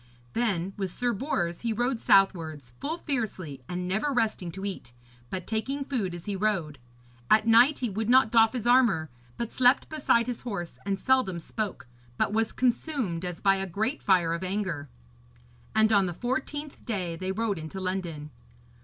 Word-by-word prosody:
Then 195 -6 0
with 195 -2 -2
Sir 245 +6 -1
Bors 195 - -2
he 235 - -1
rode 240 +2 0
southwards, 160 - +2
full 315 +4 -3
fiercely, 200 - -3
and 180 0 -3
never 215 +10 0
resting 220 -8 0
to 195 +2 -6
eat, 185 -11 -6 0.4
but 185 -2 -4
taking 270 +6 -2
food 215 -11 -2
as 175 - -9
he 205 - -2
rode. 185 -8 -1 0.5
At 215 0 +5
night 235 +6 +6
he 245 - -2
would 215 +3 -2
not 255 -3 +5
doff 225 0 +5
his 245 -3 -3
armour, 230 - +4 0.3
but 235 - -3
slept 255 +2 +4
beside 275 -6 +2
his 245 -1 -4
horse; 200 -8 -5
and 195 -1 0
seldom 225 -5 +2
spoke, 205 - -4 0.3
but - - +1
was 225 0 +1
consumed 245 - -1
as 180 -2 -5
by 195 -1 +4
a 195 0 -3
great 220 - -2
fire 180 -4 +3
of 170 +2 -3
anger. 185 -7 -3 0.9
And 220 0 +4
on 200 -2 +4
the 175 - -4
fourteenth 270 - -4
day 185 -8 -2
they 185 +3 -3
rode 210 -2 -1
into 160 +4 -6
London. 175 -5 -3
205 Hz, 175 wpm, -28 LUFS, 180-240 Hz, 0.9 s, night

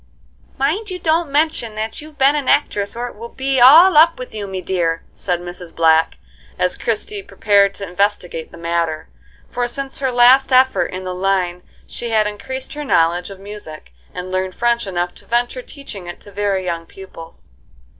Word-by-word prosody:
"Mind 360 +11 -1
you 365 - -4
don't 325 -2 +1
mention 285 -6 0
that 220 +4 -4
you've 305 0 -13
been 275 +2 +4
an 290 -3 -2
actress 205 -9 +1
or 240 +1 -3
it - - -10
will 230 +3 -9
be 265 +1 -1
all 320 +9 +8
up 330 +2 +6
with 255 - -8
you, 210 -2 -5
me 190 -1 -4
dear," 170 -3 -1
said 180 -2 -2
Mrs. 175 -1 -9
Black, 160 0 +3 0.4
as 180 0 +1
Christie 400 - -2
prepared 200 - +2
to 200 - -6
investigate 180 -3 -2
the - - -12
matter, 170 - -2 0.4
for 245 0 -1
since 270 +2 -5
her 265 -2 0
last 250 +3 +5
effort 260 +1 +4
in 185 0 -7
that 185 0 -4
line 180 -1 -1 0.2
she 240 - -6
had 215 -1 +2
increased 260 +6 -5
her 295 0 -5
knowledge 175 - +1
of 195 -1 -10
music, 195 - -10 0.2
and 180 +1 -7
learned 185 0 -2
French 235 -2 0
enough 175 -1 -2
to - - -16
venture 240 +2 0
teaching 235 - -10
it 175 - -8
to 205 - -13
very 200 -2 -1
young 165 -2 -4
pupils. 165 -4 -12
210 Hz, 185 wpm, -19 LUFS, 180-265 Hz, 0.4 s, all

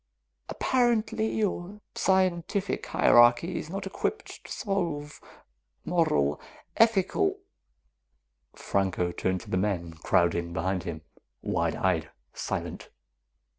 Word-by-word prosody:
Apparently, 225 -3 +1
your 205 -1 -2
scientific 190 +1 0
hierarchy 120 +9 +5
is 155 - -7
not 195 +3 -4
equipped 195 - -4
to - - -12
solve 170 -8 -3 0.6
moral, 75 - +1 0.3
ethical 230 - +3 0.6
" 60 +1 -50
Franco 95 -2 0
turned 95 +1 -1
to - - -12
the 95 - +1
men, 90 -4 -1
crowding 85 +1 +1
behind 90 +1 -1
him, 80 -2 -5 0.4
wide - - 0
eyed, - - 0 0.2
silent. - - -4
145 Hz, 100 wpm, -28 LUFS, -, 0.6 s, hierarchy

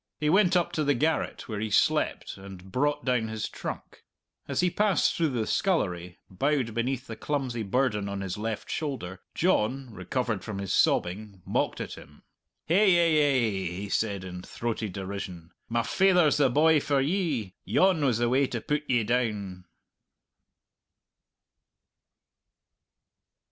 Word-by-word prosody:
He 150 0 +1
went 185 -1 +4
up 175 - 0
to 155 - -1
the 145 -1 +2
garret 155 +5 -1
where 110 -4 -4
he 110 +1 -2
slept - - +1
and 95 -1 -11
brought 145 +5 0
down 125 -4 +1
his 110 -1 -3
trunk. - - -7 0.4
As - - 0
he 180 -1 +2
passed 210 -1 +2
through 165 -2 +1
the 120 -5 -1
scullery, 90 - -1
bowed 125 +4 0
beneath 125 +3 -2
the 115 - -7
clumsy 130 -3 -2
burden 105 -2 0
on 100 0 -4
his 95 -2 -3
left 110 0 -4
shoulder, 125 - -4
John, 130 - +1
recovered 115 -2 -2
from 105 -2 -5
his 100 -2 -3
sobbing, 95 +1 +1
mocked - - -1
at - - -5
him. 75 +1 -17 0.4
"Hay 185 +6 +4
ay 155 - +4
ay," 95 -3 -3
he 100 +2 -5
said, 100 -3 -1
in 90 -1 -7
throaty 115 +2 -4
derision, 95 -3 -6 0.2
"my 115 0 +1
faither's 180 -4 +3
the 140 -3 +4
boy 155 +4 +4
for 140 -1 +1
ye. 140 - -1
Yon 185 -5 +3
was 125 -6 +2
the 120 0 +1
way 130 +3 +3
to 120 - -3
put 150 +5 -1
ye 120 -3 +3
down!" 105 -6 -2
120 Hz, 150 wpm, -27 LUFS, 100-150 Hz, 0.4 s, went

